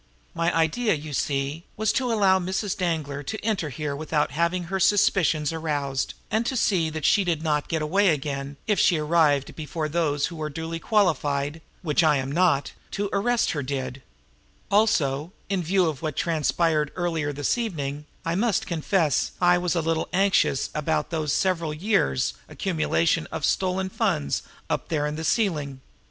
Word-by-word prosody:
My 170 +1 +1
idea, 185 +6 +2
you 150 0 -7
see, 140 +3 -1
was 215 0 +1
to 255 -3 0
allow 195 -4 +4
Mrs. 190 +2 -2
Danglar 155 -6 -2
to 180 +10 -4
enter 200 -9 0
here 145 +1 -4
without 150 0 -1
having 170 +3 0
her 190 +3 -3
suspicions 175 -6 +3
aroused, 145 -4 -2 0.2
and 220 +2 +2
to 260 - -1
see 180 -8 +2
that 155 -1 -4
she 205 - +4
did 165 -4 -1
not 150 -2 0
get 160 -2 -1
away 195 +7 +2
again 140 -2 -2
if 210 -2 +1
she 175 - +4
arrived 150 -3 +2
before 155 0 -3
those 150 -3 0
who 165 -2 -6
are 155 - -2
duly 165 +2 -5
qualified 155 -7 +1 0.2
which 155 0 +2
I 150 -2 +4
am 135 0 -3
not 165 -3 +2 0.2
to 200 0 -2
arrest 240 +4 +2
her 145 - -2
did; 130 -1 -4 0.7
also, 170 -7 +2 0.2
in 195 -2 0
view 180 +2 +2
of 155 -5 -2
what 155 -3 -3
transpired 155 -1 +1
earlier 165 -5 -1
this 145 -1 0
evening, 150 - -4 0.2
I 165 - 0
must 205 +2 +1
confess 165 -2 0
I 175 0 +4
was 180 0 -1
a 170 - +2
little 165 0 -1
anxious 190 -7 +2
about 150 +3 -1
those 155 -3 -1
several 170 -5 0
years' 150 - +1 0.2
accumulation 165 -2 0
of 160 -2 -2
stolen 190 0 0
funds 70 - 0 0.3
up - - -2
there 150 -3 0
in 150 0 -2
the 160 - -5
ceiling. 155 - 0
160 Hz, 170 wpm, -25 LUFS, 145-185 Hz, 0.7 s, allow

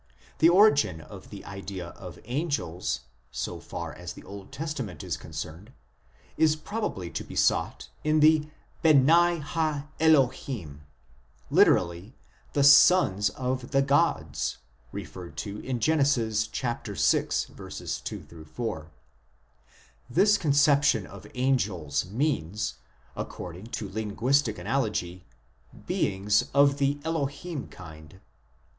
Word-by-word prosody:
The 165 - +7
origin 175 - +5
of 80 - -12
the - - -10
idea 95 -2 -7
of 90 -4 -11
angels, 125 - -2 0.3
so 65 -2 -4
far - - -6
as 90 -4 -8
the - - -13
Old 100 +2 -10
Testament 135 - -5
is - - -2
concerned, 90 +11 -8 0.6
is 155 -1 +4
probably 155 - -4
to - - -4
be - - -11
sought - - +1 0.2
in 155 0 +2
the 155 0 +4 0.2
" - - -32
Beni 165 +3 +5
ha 150 -1 -2
Elohim," 130 - +1 0.7
lit. 90 +6 +3 0.2
" - - -32
the 140 - +2
sons 140 - +6
of 130 +2 -3
the 135 -1 +3
gods," 135 - +1 0.3
referred 85 -4 -8
to 100 +4 -5
in 130 -2 -3
Gen. 160 +5 +2
vi. 120 -6 +1
2 110 +3 -1 1.7
4 115 +7 -3
l; 80 - -14 1.2
this 205 - +4
conception 140 - +3
of 100 -2 -12
angels 100 - 0
means, 105 - -1 0.4
according 90 +4 -7
to 110 -3 -5
linguistic 110 +8 0
analogy, 105 -9 -2 0.3
" 60 0 -21
beings 100 +2 +1
of 140 0 +5
the 140 +1 +1
Elohim 160 0 -3
kind." 80 0 -13
125 Hz, 115 wpm, -27 LUFS, 95-145 Hz, 1.7 s, The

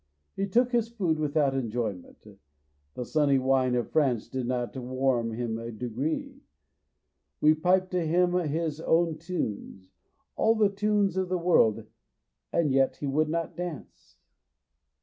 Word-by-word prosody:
He 195 - -1
took 245 +5 +2
his 235 -2 +1
food 180 -9 -1
without 150 -2 +1
enjoyment, 115 -9 -4 0.7
the 125 - -4
sunny 145 0 +2
wine 130 -1 +2
of 120 - -2
France 135 -8 +1
did 130 -2 -4
not 125 0 -2
warm 130 -2 -1
him 115 -1 -3
a 115 +1 -6
degree. 125 +7 -4 1.0
We 155 +1 +5
piped 185 +4 +1
to 180 -2 0
him 175 +2 +2
his 160 -2 -1
own 165 -1 +1
tunes, 105 - -5 0.4
all 225 +1 +3
the 215 -2 +3
tunes 200 -2 0
of 185 -1 -1
the 185 - 0
world, 170 -11 +3 0.7
and 155 -4 +1
yet 135 0 +2
he - - -6
would 150 +3 +1
not 165 +1 -2
dance. 175 -5 -8
150 Hz, 145 wpm, -27 LUFS, 125-180 Hz, 1.0 s, We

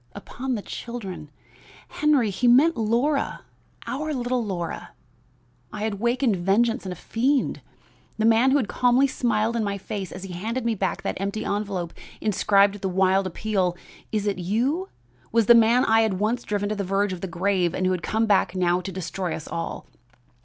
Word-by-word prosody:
Upon 260 +1 -4
the 205 - -5
children! 190 -10 -7 0.6
Henry, 285 -8 +2
he 245 +6 0
meant 280 +8 +6
Laura! 240 +7 0 0.4
our 305 +2 -3
little 245 -1 -1
Laura! 180 -5 -5 0.8
I 210 - -5
had 210 -2 -2
wakened 240 -2 +1
vengeance 215 +5 +1
in - - -4
a - - -5
fiend. 255 - 0 0.6
The 220 - +1
man 230 +3 +5
who 275 - +4
had 250 -7 0
calmly 250 +4 +3
smiled 230 -4 0
in 230 - 0
my 200 -1 -2
face 195 -1 -5
as 185 - -8
he 190 -2 -7
handed 225 +7 -3
me 230 - +2
back 195 -2 -2
that - - -3
empty 200 +2 -3
envelope 200 -4 -2 0.3
inscribed 200 -1 +3
with 205 - -10
the 190 - -1
wild 190 +1 +2
appeal, 185 -1 -1 0.3
'Is 210 -2 -1
it 200 -2 -1
you?' 255 - -1 0.4
was 230 -1 +3
the 235 - +8
man 235 +2 +5
I 225 0 +4
had 220 -4 +1
once 215 +6 0
driven 205 -2 -2
to 215 - -1
the 200 - -2
verge 195 +1 0
of 175 - -7
the 190 - -3
grave 180 0 0
and 185 - -1
who 185 - +2
had 180 -2 -1
come 220 +5 0
back 200 -3 +2
now 180 -1 +2
to 190 - -6
destroy 185 -1 -4
us 155 - -8
all. 165 0 -5
210 Hz, 190 wpm, -24 LUFS, 190-235 Hz, 0.8 s, the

